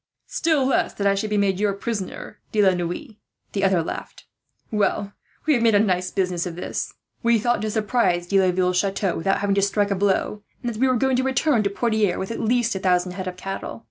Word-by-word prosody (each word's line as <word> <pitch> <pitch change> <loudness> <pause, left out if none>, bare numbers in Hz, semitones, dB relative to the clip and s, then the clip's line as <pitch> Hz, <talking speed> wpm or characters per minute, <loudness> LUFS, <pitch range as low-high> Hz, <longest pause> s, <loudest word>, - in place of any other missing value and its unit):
"Still 315 -5 +1
less 265 - +1
that 200 - -2
I 200 - +5
should 200 +2 -2
be 210 - 0
your 200 0 +1
prisoner, 200 -1 -5
De 215 - -1
la 190 -1 +5
Noue," 180 - -4 0.3
the 200 - -2
other 190 -4 +3
laughed. - - -7 0.5
"Well, 205 -1 0 0.3
we 310 - +4
have 240 - +2
made 225 -2 +4
a - - +6
nice 185 -3 +1
business 185 -2 -1
of 170 - -6
this. 180 - -4 0.3
We 235 0 +4
thought 240 0 +1
to 215 - -1
surprise 210 -5 +1
De 195 +2 +2
Laville's 180 -1 +2
chateau, 195 -1 0
without 195 +5 0
having 200 -1 +1
to 200 - +2
strike 200 +1 +1
a - - +2
blow; 200 +2 0 0.2
and 240 -1 -2
that 215 - -8
we 265 - +5
were 255 - +3
going 260 +1 +2
to 260 - +1
return 265 -1 +2
to 200 - 0
Poitiers 215 -3 +1
with 190 - -4
at 230 - -4
least 235 +1 +1
a 190 - -3
thousand 180 -1 +1
head 185 0 -5
of 180 0 -5
cattle. 195 -11 -5
200 Hz, 230 wpm, -23 LUFS, 185-230 Hz, 0.5 s, a